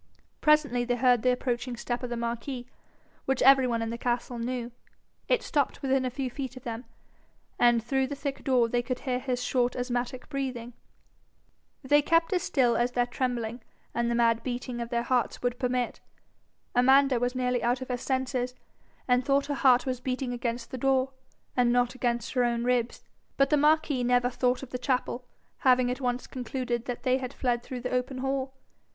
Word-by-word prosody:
Presently 300 -5 +3
they 245 0 0
heard 245 -1 +3
the 255 - +3
approaching 245 -1 -2
step 240 +1 -3
of 250 - -4
the 240 - -3
marquis, 235 +2 -4 0.6
which 270 -1 +1
every 270 0 +7
one 230 -2 0
in 225 - -3
the 235 - -5
castle 240 0 -2
knew. 240 0 -3 0.6
It - - +2
stopped 285 -3 -1
within 265 -1 +2
a - - 0
few 260 +1 -3
feet 260 0 -6
of 255 - -11
them, 235 +1 -5 0.7
and 240 -2 +4
through 265 +2 0
the 285 - -5
thick 280 -1 -5
door 250 -3 +3
they 240 +1 0
could 250 +1 -4
hear 250 -2 -1
his 250 -1 -2
short 250 -1 +1
asthmatic 245 0 -3
breathing. 255 -4 -4 1.1
They 290 +3 +4
kept 330 +4 +2
as 360 - +2
still 245 -6 +2
as 240 +1 +1
their 245 -1 +2
trembling, 245 -2 -3 0.3
and 235 0 0
the 235 - 0
mad 230 -1 +3
beating 245 0 -4
of 235 - -4
their 235 0 0
hearts, 245 0 0
would 245 0 -1
permit. 250 -1 -1 0.7
Amanda 265 +1 +5
was 245 +1 -1
nearly 250 -1 0
out 245 +2 +1
of 260 - -6
her 250 - 0
senses, 255 -1 -2 0.5
and 250 0 +3
thought 275 +1 +2
her 290 - -2
heart 260 -4 +4
was 255 -2 -2
beating 255 0 -2
against 235 0 -3
the 260 - -5
door, 265 0 +2 0.4
and 245 -1 +3
not 245 0 +2
against 240 -3 -2
her 250 - +2
own 235 -1 0
ribs. 245 -1 0 0.3
But 275 +1 +3
the - - +6
marquis 300 -3 +3
never 245 0 +2
thought 250 +1 0
of 260 - -9
the 250 - -3
chapel, 250 -1 -1 0.3
having 255 -1 +4
at 255 - -4
once 250 0 -1
concluded 245 -1 -3
that 245 -1 -5
they 255 +1 +2
had 255 0 -6
fled 245 -2 0
through 250 0 -6
the 250 - -4
open 250 +1 -1
hall. 265 0 -2
250 Hz, 195 wpm, -28 LUFS, 240-265 Hz, 1.1 s, every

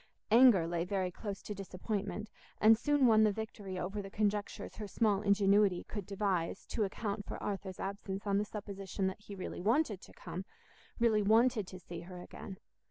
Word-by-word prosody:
Anger 230 -7 +7
lay 170 0 -1
very 185 0 -1
close 200 +1 -6
to 210 - -5
disappointment, 200 +2 -4 0.3
and 220 +1 +7
soon 290 +4 +2
won 220 -2 +6
the 215 - +5
victory 205 -3 -5
over 195 +3 -3
the 195 - -8
conjectures 205 0 -2
her 210 - -5
small 205 -1 +2
ingenuity 200 -2 +4
could 205 -4 -6
devise 195 -4 -1
to 220 - 0
account 205 +1 -3
for - - -6
Arthur's 195 -2 -4
absence 195 0 -4
on 200 -1 +2
the 210 - 0
supposition 200 -2 -4
that 190 +2 -2
he 205 -1 -9
really 185 - -5
wanted 225 - +2
to - - -14
come, 185 - -6 0.5
really 225 -2 +3
wanted 220 0 +4
to 185 - -9
see 170 -1 -8
her 180 +1 -9
again. 190 +2 -9
200 Hz, 180 wpm, -33 LUFS, 190-215 Hz, 0.5 s, Anger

